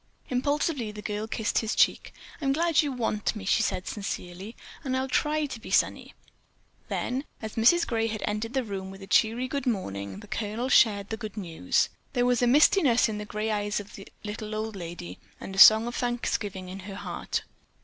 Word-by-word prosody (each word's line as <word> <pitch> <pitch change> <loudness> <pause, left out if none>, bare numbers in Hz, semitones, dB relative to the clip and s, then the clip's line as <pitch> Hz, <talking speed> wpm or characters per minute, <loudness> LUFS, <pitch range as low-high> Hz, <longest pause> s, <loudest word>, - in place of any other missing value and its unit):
Impulsively 275 -2 0
the 210 0 -9
girl 210 +1 -3
kissed 220 0 0
his 220 -1 -2
cheek. - - +2 0.3
"I'm 270 -2 +2
glad 330 +1 +3
you 295 -2 -2
want 225 -4 -1
me," 205 -2 -7
she 200 - +3
said 185 -3 -1
sincerely, 195 0 -5 0.3
"and 260 -2 -1
I'll 260 0 -1
try 300 +3 +1
to 265 -5 -6
be - - -10
sunny." - - +1 0.7
Then, 255 +3 -2 0.2
as 220 -1 -6
Mrs. 295 +10 +4
Gray 225 -2 0
had 215 -1 -4
entered 215 +3 -3
the 265 - +1
room 195 -3 -5
with 195 0 -10
a - - -7
cheery 225 +6 +2
good 280 0 -3
morning, 100 - -3
the - - -12
Colonel 220 +5 -3
shared 205 -6 +4
the 220 - -2
good 215 -2 -7
news. 165 - 0 0.2
There 245 0 +2
was 245 -1 +2
a 245 - +4
mistiness 270 - +5
in 210 -1 -4
the 210 - -5
grey 215 0 -2
eyes 205 0 -1
of 205 0 -10
the 195 - -10 0.2
little 215 0 -5
old 215 0 -3
lady 170 - -7 0.2
and 190 - -7
a - - -1
song 220 +3 +10
of 240 - -4
thanksgiving 215 -6 -2
in 190 +2 -7
her 195 +1 -8
heart. - - -4
220 Hz, 200 wpm, -27 LUFS, 200-245 Hz, 0.7 s, song